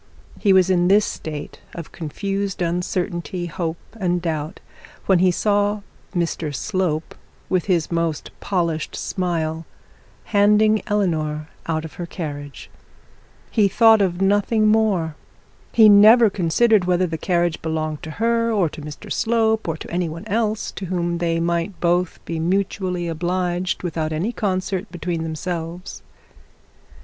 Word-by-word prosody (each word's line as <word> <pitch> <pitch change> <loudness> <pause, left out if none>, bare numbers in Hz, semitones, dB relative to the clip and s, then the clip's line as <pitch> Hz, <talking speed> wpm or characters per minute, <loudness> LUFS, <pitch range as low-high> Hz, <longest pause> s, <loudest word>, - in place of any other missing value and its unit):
He 200 - +3
was 190 -1 +5
in 175 -1 +3
this 205 +2 +5
state 150 -2 -6 0.2
of 165 -4 -8
confused 195 +4 -3
uncertainty, 175 0 -2
hope, 165 0 -3 0.2
and 180 -2 +1
doubt, 160 -1 -3 0.5
when 190 -3 +4
he 185 +1 +4
saw 205 +2 +1 0.3
Mr 165 -4 -1
Slope, 180 -3 -2 0.4
with 185 -2 +1
his 175 -5 0
most 165 -2 -1
polished 170 -5 -1
smile, 165 -4 -2 0.6
handing 210 +1 +3
Eleanor 155 -7 -1 0.2
out 160 -1 -1
of 160 - -9
her 170 - -4
carriage. 145 -5 -7 0.8
He 210 -3 +4
thought 220 +2 +5
of 185 -1 0
nothing 205 +2 +2
more. 210 -7 +2 0.6
He 220 -2 +7
never 215 +2 +7
considered 195 +3 +3
whether 180 0 +2
the 165 -2 -4
carriage 175 -2 0
belonged 155 -1 -3
to 160 - -7
her 230 +1 +1
or 195 -7 +2
to 150 - -10
Mr 150 +7 -7
Slope, 220 -2 +1
or 165 -1 -2
to - - -9
any 175 -1 -1
one 165 +5 -8
else 215 0 -1
to 190 - -6
whom 175 -1 -1
they 165 -1 0
might 170 +3 -1
both 175 0 +1
be 165 -1 -3
mutually 180 0 -1
obliged 180 +2 -1
without 160 -2 -2
any 170 +9 -1
concert 190 -2 -2
between 170 -1 -3
themselves. 165 +3 -5
180 Hz, 140 wpm, -21 LUFS, 165-200 Hz, 0.8 s, He